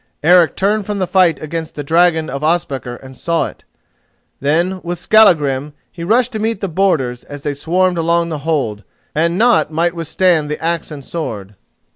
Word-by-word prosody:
Eric 175 0 +5
turned 205 +1 0
from 210 -1 -2
the 190 - 0
fight 180 -4 +3
against 160 +1 -5
the 145 - -5
dragon 160 +1 +2
of 140 -2 -5
Ospakar 140 -6 -1
and 130 0 -11
saw 170 +5 -1
it. - - -10 0.7
Then, 170 +7 0
with 175 +1 -4
Skallagrim, 150 -9 +3 0.2
he 170 - -8
rushed 240 +7 +2
to 220 - -4
meet 220 -1 -1
the 195 - -2
boarders 155 -9 0
as 145 -1 -9
they 145 - -2
swarmed 175 +5 0
along 170 +1 +1
the 155 -2 -4
hold, 135 -9 -2 0.3
and 170 +3 +1
naught 235 -5 +3
might 165 +2 +1
they 170 - -15
withstand 165 -1 +1
the 150 - -3
axe 165 0 -2
and 145 -4 -9
sword. 105 - -5
165 Hz, 185 wpm, -17 LUFS, 145-180 Hz, 0.7 s, Eric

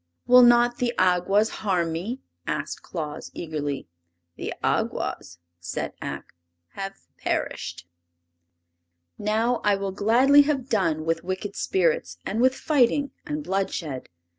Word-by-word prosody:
"Will 250 +1 +8
not 240 0 +5
the 245 -1 0
Awgwas 185 +4 +3
harm 180 -5 +1
me?" 205 +11 -4 0.3
asked - - -3
Claus, 155 -4 -6
eagerly. 145 - -4 0.5
"The - - -5
Awgwas," 85 - -1 0.2
said 85 0 -4
Ak, - - -6 0.4
"have 195 - -7
perished!" 90 - -3 1.3
Now 225 +4 +1
I 205 -1 +4
will 195 0 -3
gladly 240 +9 +5
have 280 -3 -1
done 165 -7 +1
with 165 0 0
wicked 190 +2 -4
spirits 160 - 0
and 220 +4 -1
with 260 +1 +4
fighting 280 -1 +2 0.2
and 300 0 -3
bloodshed. 180 - -2
195 Hz, 120 wpm, -25 LUFS, 165-240 Hz, 1.3 s, Will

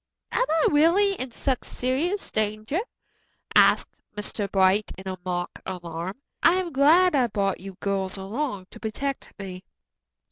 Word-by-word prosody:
"Am - - +2
I 320 0 +3
really 340 +7 +4
in 260 -8 -5
such 255 +2 -1
serious 305 +11 -2
danger?" 215 - -1 0.7
asked - - +4 0.2
Mr. 205 -1 -3
Bright 195 +2 +3
in 190 0 -5
mock 175 -1 -3
alarm. 175 0 -5 0.3
"I 335 - +6
am 365 -2 -1
glad 325 +7 +5
I 260 -4 +3
brought 200 -3 -1
you 195 0 -9
girls 195 -1 -1
along 205 +1 -3
to - - -12
protect 270 +5 -4
me." 185 -2 -7
215 Hz, 140 wpm, -25 LUFS, 190-295 Hz, 0.7 s, I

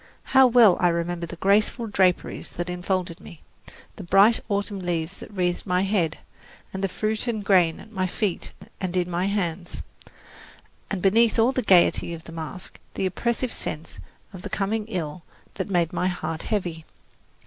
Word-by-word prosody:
How 265 -1 +8
well 230 -6 +6
I 180 - +4
remember 170 0 -1
the 175 - -8
graceful 210 +6 +2
draperies 190 -4 0
that 175 +1 -4
enfolded 180 -1 -2
me, 170 -5 -13 0.5
the 200 - -7
bright 200 +6 +5
autumn 200 0 -1
leaves 175 0 -3
that - - -10
wreathed 180 -2 -2
my 180 0 +2
head, 190 -5 0 0.6
and 190 0 -4
the 195 - +1
fruit 215 +5 -2
and 220 -4 -2
grain 180 -5 +4
at 220 - -13
my 185 -3 -1
feet 190 0 -2 0.3
and 185 -1 -2
in 180 -1 +1
my 175 +2 0
hands, 180 -3 -3 1.1
and 195 -3 -3
beneath 225 +4 +4
all 230 +3 +4
the 260 - -1
piety 175 -4 +4
of 165 - -12
the 165 - -11
masque 165 +2 -7 0.2
the - - -1
oppressive 235 +6 -1
sense 155 +2 -6 0.3
of 185 - -9
coming 210 +2 -1
ill 175 -6 -4 0.3
that 190 0 -4
made 175 -4 +1
my 180 - 0
heart 175 -3 -3
heavy. 175 -7 -3
185 Hz, 170 wpm, -24 LUFS, 175-210 Hz, 1.1 s, How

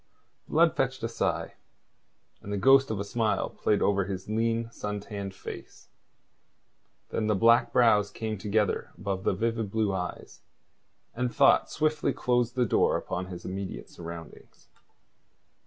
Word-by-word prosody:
Blood 165 +1 +3
fetched 135 -1 -1
a - - +1
sigh, 115 - -2 0.9
and 100 - -8
the 100 - -1
ghost 135 +5 +5
of 110 -3 -2
a - - -1
smile 110 +1 -1
played 105 - +1
over 100 -1 +2
his 95 -1 -5
lean, 115 +1 0
sun 105 -2 -4
tanned 100 -2 -6
face. - - -10 1.2
Then 110 - -1
the 105 - +2
black 115 +5 +4
brows 105 -4 +4
came 110 -1 -4
together 105 0 0
above 100 -2 -3
the - - +2
vivid 115 +1 -1
blue 105 -1 0
eyes, 90 -1 -5 0.7
and 125 0 -1
thought 140 +2 +4
swiftly 155 0 0
closed 120 -1 0
the 125 -1 +2
door - - +2
upon 90 +1 -4
his 90 -2 -8
immediate 95 0 -6
surroundings. 85 -1 -11
110 Hz, 145 wpm, -28 LUFS, 100-120 Hz, 1.2 s, ghost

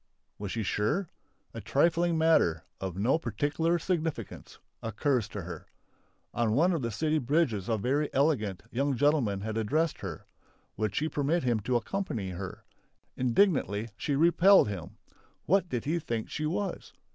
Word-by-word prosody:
Was 100 -2 -4
she 115 - -2
sure? 145 - 0 0.4
A - - -6
trifling 170 0 +2
matter 160 - +3 0.2
"of 95 -2 -5
no 120 +10 +2
particular 150 +7 0
significance" 160 - -3 0.2
occurs 115 +1 0
to 105 -3 -6
her. 85 -2 -8 0.7
On 115 -2 +1
one 170 +9 +3
of 165 - -1
the 115 - -1
city 155 +8 0
bridges 130 - 0
a 110 - +2
very 140 +7 0
elegant, 130 - +1
young 140 +2 0
gentleman 135 -9 +2
had 110 +1 -3
addressed 150 +9 0
her. 90 -6 -7 0.5
Would 110 -1 -2
she 155 - +1
permit 155 +3 0
him 120 -3 +1
to 120 +4 -1
accompany 120 - -2
her? 90 +1 -7 0.5
Indignantly 120 - +2
she 140 +6 -1
repelled 170 - +6
him. 90 -5 -7 0.5
What 185 +1 +2
did 125 0 -3
he 165 +4 0
think 115 -7 -4
she 155 -1 -2
was! 190 +5 -3
130 Hz, 155 wpm, -29 LUFS, 105-160 Hz, 0.7 s, repelled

